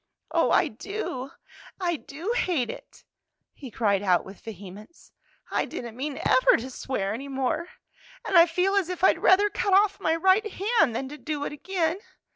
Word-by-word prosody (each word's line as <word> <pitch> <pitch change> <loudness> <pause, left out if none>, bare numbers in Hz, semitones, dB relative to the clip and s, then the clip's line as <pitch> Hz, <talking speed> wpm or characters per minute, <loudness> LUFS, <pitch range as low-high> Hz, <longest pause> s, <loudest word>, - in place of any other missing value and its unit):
"Oh, - - +2
I - - +4
do, 275 -11 -5 0.5
I 350 -2 0
do 315 +7 -6
hate 335 - 0
it!" - - -14 0.5
he 270 - -10
cried 205 -4 +1
out 185 -3 +2
with 195 0 -12
vehemence. 210 - -11 0.4
"I - - 0
didn't 235 -2 -7
mean 275 +2 -4
ever - - +5
to 255 +3 -7
swear 210 -6 -3
any 270 +5 -6
more, 270 +5 -2 0.6
and 390 - -1
I 340 0 +8
feel 360 +4 +1
as 385 -3 +1
if 365 0 -5
I'd - - +5
rather 405 +2 +4
cut 400 -1 0
off 400 0 +3
my 320 -4 +1
right 380 +5 +2
hand 395 - +2
than 265 - -3
to 295 +1 -9
do 300 -2 -4
it - - -4
again! 340 +2 -1
320 Hz, 180 wpm, -26 LUFS, 250-380 Hz, 0.6 s, I